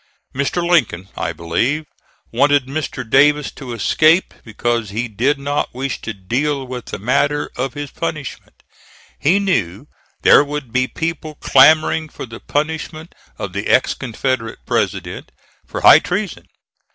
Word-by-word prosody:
Mr. 140 +6 -1
Lincoln, 105 - +1
I - - -2
believe, 120 - -1 0.5
wanted 140 +2 +3
Mr. 135 -3 -4
Davis 145 +4 +4
to 130 -4 -9
escape, 155 - +3
because 115 0 -2
he 115 +4 -3
did 125 +7 0
not 140 -2 -2
wish 135 +1 -3
to - - -4
deal 130 +8 -2
with 125 -1 -7
the - - -6
matter 140 +6 0
of 130 +1 -3
his 145 -1 -6
punishment. 155 -5 -6 0.6
He 170 +7 +3
knew 125 - -1 0.4
there - - +7
would 145 -4 -6
be 130 0 +2
people 160 -1 -4
clamoring 155 +3 +4
for - - -8
the 115 -2 -10
punishment 160 +2 -3 0.2
of 95 -3 -5
the 100 +1 -3
ex 130 - +3
Confederate 125 -2 -3
president, - - -2 0.4
for - - -5
high - - +9
treason. - - -4
135 Hz, 140 wpm, -18 LUFS, 115-150 Hz, 0.6 s, high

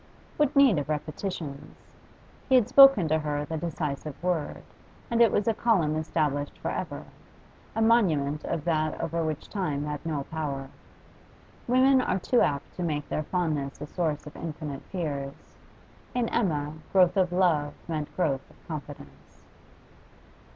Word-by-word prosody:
What 295 -2 +2
need 270 - +6
of 145 - -5
repetitions? 155 -1 -4 0.7
He 260 - +5
had 245 -5 +5
spoken 275 - +8
to 160 +1 +2
her 150 -1 -2
the 160 - -4
decisive 150 -3 -3
word, 175 -4 -1 0.5
and 235 0 +3
it 230 -3 +6
was 205 - 0
a 225 - +4
column 195 -10 +2
established 150 -2 -1
for - - -3
ever, - - -4 0.7
a 225 - +2
monument 155 -11 +2
of 165 -3 -3
that 155 -2 0
over 165 0 -1
which 155 -1 -3
time 150 -8 -2
had 150 -1 -4
no 155 -4 -2
power. 140 -3 -4 1.0
Women 260 +2 +5
are 190 - 0
too 240 +6 +2
apt 140 -1 0
to - - -4
make 150 -4 -2
their - - -1
fondness 155 -5 -2
a - - -5
source 155 -2 -2
of 150 - -10
infinite 150 -3 -6
fears; 145 -6 -5 0.6
in 245 -2 +1
Emma 150 -10 0 0.2
growth 185 -1 +5
of 185 -2 +2
love 165 -5 +2
meant 155 -3 -3
growth 140 -7 -1
of - - -23
confidence. 140 - -9
155 Hz, 150 wpm, -27 LUFS, 145-185 Hz, 1.0 s, spoken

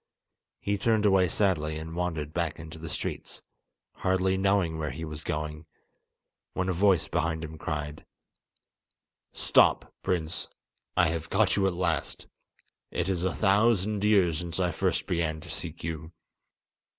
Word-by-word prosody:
He 100 0 -1
turned 110 -1 +2
away 95 -2 +5
sadly 80 -5 +1
and 80 +1 -6
wandered 80 -4 -2
back 85 -2 -1
into 80 -1 -9
the 80 0 -6
streets, 70 - -5 0.5
hardly 95 0 +2
knowing 95 -4 +2
where 75 -1 -1
he 80 - -5
was 75 0 -7
going; 75 +1 -4 0.9
when 95 0 0
a - - +2
voice 95 -1 +3
behind 80 -1 -1
him 80 0 -7
cried: 75 -1 -4 1.3
"Stop, - - +3
prince, 80 -3 -1 0.5
I 85 - +5
have 80 -1 -3
caught - - +3
you 95 -1 +3
at 95 - 0
last! 85 -3 -1 0.6
It 90 +1 -1
is 90 -2 0
a 95 - 0
thousand 105 0 +3
years 95 -7 +4
since 85 0 -4
I 90 -1 +2
first 80 - 0
began 80 -3 -1
to - - -11
seek - - -5
you." 80 0 -4
85 Hz, 150 wpm, -28 LUFS, 80-95 Hz, 1.3 s, away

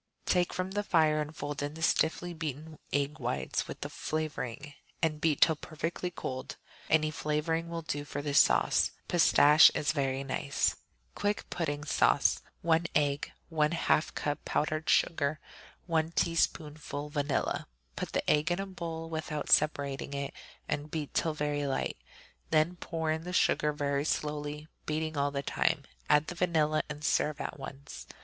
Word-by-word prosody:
Take 180 -1 +2
from 185 +1 -3
the 205 +1 0
fire 155 -6 +3
and 150 +1 -6
fold 145 0 -4
in 145 +1 -3
the 160 - -6
stiffly 165 +2 +1
beaten 155 -1 -6
egg 145 +2 0
whites - - -2
with - - -8
the - - -2
flavoring, 150 -2 -4 0.3
and 155 -2 0
beat 160 -3 +2
till 160 - +6
perfectly 165 +3 -4
cold. 130 -5 -5 0.3
Any 155 -1 +3
flavoring 155 +2 -1
will 170 -1 -4
do 145 -2 -3
for 145 0 -5
this 145 -1 +6
sauce; - - +3 0.2
pistache 155 -3 +7
is 150 - +1
very 135 -3 -1
nice. 140 +1 0 0.4
Quick 205 0 -1
Pudding 145 -4 -2
Sauce - - +3 0.2
1 165 0 +3
egg. 145 -1 +1 0.2
1/2 155 0 +1
cup 145 0 -2
powdered 155 +1 -1
sugar. 150 -2 +2 0.5
1 165 -1 0
teaspoonful 150 -3 -1
vanilla. 145 -1 -1 0.3
Put - - -5
the - - -1
egg 150 +2 +3
in 175 +2 0
a 195 - -2
bowl 165 -4 -5
without 155 -2 -4
separating 140 -2 +2
it 140 0 -3 0.3
and 150 +1 -2
beat 150 -2 -4
till 160 -2 +1
very 145 -1 -1
light; 135 - -1 0.5
then 160 +3 +3
pour 160 -2 -2
in 160 +1 -2
the 180 +1 -6
sugar 150 -4 +3
very 145 -1 -1
slowly, 150 0 -2 0.2
beating 155 +1 -1
all 140 0 +1
the 140 0 -3
time; - - +1 0.3
add 150 +1 +5
the 175 - -5
vanilla 160 -3 +2
and 150 0 -6
serve 150 -1 +1
at - - -5
once. 140 +1 -9
155 Hz, 160 wpm, -31 LUFS, 145-160 Hz, 0.5 s, pistache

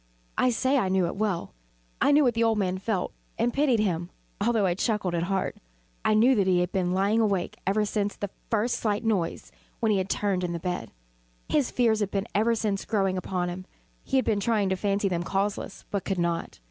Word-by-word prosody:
I 255 - +3
say 260 +3 +2
I 190 - 0
knew 190 -1 +2
it 170 - -3
well. 195 - -2 0.5
I - - +5
knew 295 +1 +6
what 245 -3 +3
the 230 +1 +1
old 225 -1 +3
man 185 -2 0
felt, 195 -2 -2 0.2
and 235 +1 +1
pitied 275 -5 +3
him, 175 -4 0 0.3
although 225 -2 +2
I 180 - +2
chuckled 200 -1 -1
at 170 - 0
heart. 195 -1 -1 0.5
I 215 - +3
knew 240 +5 +5
that 200 -6 +2
he 180 -1 +4
had 180 +1 -1
been 180 -2 0
lying 200 +4 +2
awake 200 -5 0
ever 210 +2 +2
since 205 -1 -1
the 200 -1 -5 0.2
first 225 +2 +1
slight 210 -1 0
noise, 200 -7 -1 0.3
when 225 -3 +2
he 200 - +3
had 190 +1 -2
turned 195 -3 0
in 175 -1 -1
the 170 - -3
bed. 180 +1 -3 0.6
His 290 -5 +2
fears 230 -3 +2
had 205 -2 0
been 200 0 -1
ever 225 +3 +3
since 205 -3 -1
growing 195 -4 0
upon 185 -1 -2
him. 180 +1 -6 0.4
He - - -2
had 260 - +2
been 210 -2 +1
trying 205 -2 +1
to 190 - +1
fancy 200 +1 0
them 175 -3 -1
causeless, 195 +2 -2
but 200 -2 -1
could 195 - -2
not. 170 - -2
200 Hz, 225 wpm, -27 LUFS, 185-225 Hz, 0.6 s, knew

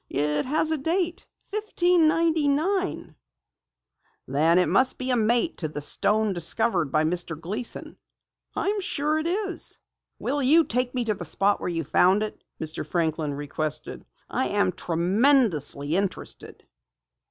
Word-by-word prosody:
"It 150 - 0
has 310 +3 +1
a 315 - 0
date 345 +4 -1 0.2
1599." 340 -3 +1 1.1
"Then 155 +6 +2
it 180 - +4
must 260 0 +3
be 255 0 -1
a - - +4
mate 240 +7 +1
to 160 - -1
the 150 -1 -6
stone 210 +7 +1
discovered 175 - +1
by 155 - +2
Mr. 165 -1 -1
Gleason!" 210 +9 -4 0.6
"I'm 410 0 -1
sure 305 -3 0
it 315 - -2
is." 390 +2 -2 0.4
"Will 285 - -2
you 305 +6 +5
take 250 -2 -1
me 250 - 0
to 220 -2 0
the 185 - -8
spot 195 +5 +1
where - - -2
you 165 -1 -2
found 190 +8 +3
it?" 215 - -7 0.2
Mr. 160 0 -3
Franklin 160 -4 -2
requested. 145 +1 -4 0.2
"I - - -1
am 95 - +1
tremendously 175 - +1
interested." 195 0 -4
215 Hz, 140 wpm, -25 LUFS, -, 1.1 s, you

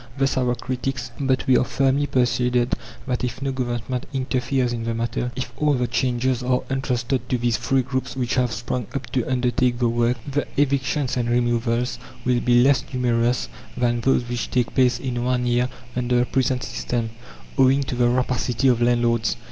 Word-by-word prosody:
Thus 135 0 +1
our 125 -1 +1
critics; 130 0 -4
but 130 -2 +1
we 130 - +4
are - - +3
firmly 135 +2 +1
persuaded 125 -1 +1 0.3
that 125 -2 -2
if 125 0 -2
no 135 0 -1
Government 125 -1 -3
interferes 130 -1 0
in 115 -1 -3
the 115 0 -2
matter, 120 +2 -2
if 130 - -4
all 150 -1 +2
the 125 -1 0
changes 125 0 0
are 125 0 +1
entrusted 125 -2 -1
to 125 - +1
these 120 -1 +1
free 135 +3 +1
groups 130 +1 -3
which 125 -2 -1
have 125 -2 +1
sprung 120 +1 -3
up 135 -2 -2
to 125 - +1
undertake 125 -1 +1
the 120 -1 +2
work, 120 +1 +1
the 145 +1 -1
evictions 140 -1 +1
and 120 -1 0
removals 120 0 0 0.3
will 125 -1 +3
be 120 0 +4
less 140 +1 +4
numerous 120 -1 +1 0.3
than 120 -1 +1
those 125 -1 +2
which 120 -1 -3
take 125 -2 0
place 125 -1 +3
in 120 -2 -3
one 125 0 +1
year 120 +1 +2 0.3
under 125 0 +1
the 120 - +3
present 130 0 0
system, 115 -4 -3 0.5
owing 135 +1 +5
to 130 - -4
the 120 -1 +3
rapacity 125 +1 +1
of 120 -1 +2
landlords. 120 -1 +2
125 Hz, 185 wpm, -23 LUFS, 120-130 Hz, 0.5 s, owing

